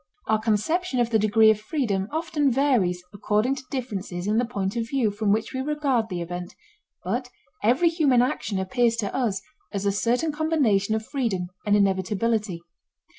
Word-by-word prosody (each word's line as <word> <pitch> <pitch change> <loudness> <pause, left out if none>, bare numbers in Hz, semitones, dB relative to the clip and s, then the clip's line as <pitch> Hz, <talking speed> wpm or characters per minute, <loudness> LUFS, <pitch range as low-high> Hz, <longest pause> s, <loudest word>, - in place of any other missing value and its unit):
Our 220 0 +2
conception 250 - 0
of 240 -1 +1
the 220 - +4
degree 220 +1 +5
of 215 - -1
freedom 215 - -1
often 310 -2 0
varies 235 -10 +1
according 210 +5 +1
to 265 - -7
differences 200 -9 -4
in 210 +2 +1
the 245 - +1
point 200 -4 -3
of 230 -1 -2
view 250 -6 +1
from 205 0 0
which 220 +5 0
we 260 - -2
regard 275 -6 0
the 175 -2 -3
event, 175 +1 -6 0.5
but - - -2 0.3
every 255 +10 +3
human 285 -7 +3
action 220 -5 -2
appears 230 +5 +1
to 215 -4 -3
us 210 -7 -1 0.3
as 200 0 -3
a 200 - +3
certain 240 +9 0
combination 275 -10 +1
of 220 0 -3
freedom 215 -11 -2 0.2
and 205 - +4
inevitability. 200 -1 0
220 Hz, 175 wpm, -25 LUFS, 200-260 Hz, 0.5 s, degree